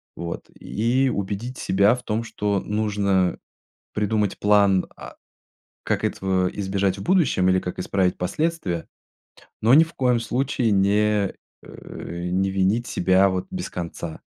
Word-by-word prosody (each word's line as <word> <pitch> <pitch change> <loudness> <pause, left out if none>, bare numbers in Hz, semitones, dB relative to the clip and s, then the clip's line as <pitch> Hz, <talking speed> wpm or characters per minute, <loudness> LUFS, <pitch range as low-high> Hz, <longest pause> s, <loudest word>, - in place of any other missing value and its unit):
Вот 85 0 -6
и 125 +5 +1
убедить 100 +6 -4
себя 100 +5 +3
в 125 - -10
том, 110 0 -2
что 105 -3 -1
нужно 100 -4 0 0.6
придумать 105 -1 0
план, 100 -2 +4
а, - - -11 0.7
как - - -1
этого 95 -1 0
избежать 95 -1 -1
в - - -6
будущем 145 - +2
или 95 0 +4
как 90 - -5
исправить 90 0 0
последствия, 95 - -2 0.7
но 115 +4 +5
ни 160 - +8
в 165 0 -4
коем 125 -3 +2
случае 125 -1 0
не, 100 0 +2 0.3
э, 85 +1 -7
не 95 +1 +1
винить 100 +5 +1
себя 95 +2 +3
вот 95 -1 -2
без 185 -1 -4
конца. 85 -2 -6
100 Hz, 140 wpm, -23 LUFS, 95-115 Hz, 0.7 s, ни